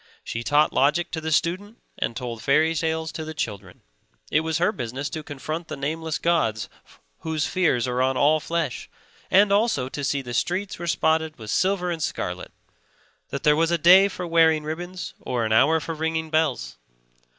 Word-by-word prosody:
She 115 - -4
taught 145 +5 +3
logic 150 +6 +2
to 160 - -3
the 160 0 -3
student 185 +8 0 0.2
and 115 - -2
told 120 -3 -5
fairy 155 +3 +3
tales 160 0 -2
to 160 - -6
the 155 0 -7
children; 100 - -5 0.5
it 155 - +4
was 160 0 -1
her 175 - +2
business 130 +3 -5
to 155 - -4
confront 155 +3 -6
the - - -6
nameless 160 +3 -3
gods 150 -11 0 0.5
whose 160 -2 -2
fears 155 -10 +1
are 125 0 0
on 130 0 +1
all 150 +4 +4
flesh, 165 -4 -3 0.4
and 200 +1 +5
also 200 - +2
to 145 - -5
see 140 0 -1
the 120 -1 -7
streets 185 - -1
were 170 - -5
spotted 160 -1 +1
with 110 -3 -7
silver 185 -1 +1
and 165 -2 -4
scarlet, 90 -10 -4 0.8
that 140 - -5
there 150 -2 +5
was 165 +1 +2
a 170 - +2
day 185 +5 +7
for 185 -2 -6
wearing 165 -2 +3
ribbons 175 +4 -6
or 120 -2 -2
an 110 - 0
hour 145 +8 +4
for 165 +2 -5
ringing 160 0 -2
bells. 130 - 0
155 Hz, 185 wpm, -24 LUFS, 135-170 Hz, 0.8 s, day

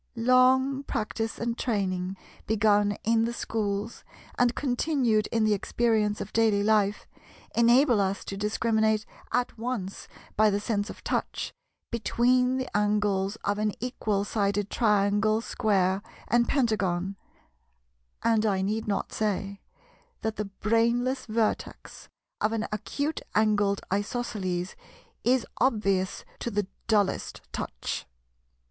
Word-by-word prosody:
Long 255 +3 +4
practice 225 -3 -3
and 230 0 -2
training, 190 -6 -1 0.3
begun 205 -1 +3
in 225 0 +3
the 235 - -2
schools 210 -1 -3 0.3
and 245 -1 +2
continued 245 -5 +1
in 225 -2 0
the 215 -1 +3
experience 210 0 +1
of 200 - -6
daily 220 -3 +3
life, 210 -1 +2 0.5
enable 240 0 +5
us 195 0 -1
to 195 - -5
discriminate 220 +1 +1 0.3
at 245 -2 -1
once 225 -5 -4 0.3
by 215 0 +5
the 200 0 0
sense 205 -1 -1
of - - -10
touch, - - -2 0.4
between 250 +2 +2
the 260 -4 -4
angles 205 -1 +1
of 205 +1 0
an 210 -1 0
equal 215 -5 -1
sided 205 -1 0
Triangle, 210 -1 +2
Square, 195 -4 +1 0.3
and 235 0 +3
Pentagon; 200 -8 +1 1.1
and 225 -2 +3
I 195 -3 +1
need 215 +3 -1
not 200 -1 -2
say 200 -2 -2 0.6
that 220 -1 -2
the 210 - -2
brainless 235 +6 0
vertex 220 0 -2 0.3
of 215 +1 +1
an 225 -1 -1
acute 285 +8 -2
angled 205 -2 +2
Isosceles 200 -4 -2 0.5
is 250 -1 +3
obvious 200 -6 +1
to - - -2
the 205 -2 -1 0.2
dullest 205 -4 +1
touch. - - -4
215 Hz, 120 wpm, -27 LUFS, 200-235 Hz, 1.1 s, enable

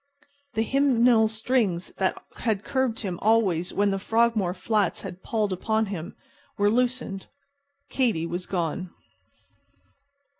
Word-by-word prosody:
The 220 - +2
hymeneal 245 -3 +4
strings 220 -5 0
that 190 -1 0 0.2
had 215 -4 -1
curbed 260 -4 -1
him 185 -5 -4
always 200 -6 +2
when 200 0 +2
the 195 - -1
Frogmore 225 -4 +1
flats 205 -1 0
had 185 -1 -7
palled 215 -4 -1
upon 220 +4 0
him 185 -5 -6 0.4
were 205 0 +3
loosened. 245 -5 -1 0.6
Katy 230 -11 +1
was 175 +2 -4
gone. 180 0 -2
210 Hz, 120 wpm, -26 LUFS, 185-230 Hz, 0.6 s, hymeneal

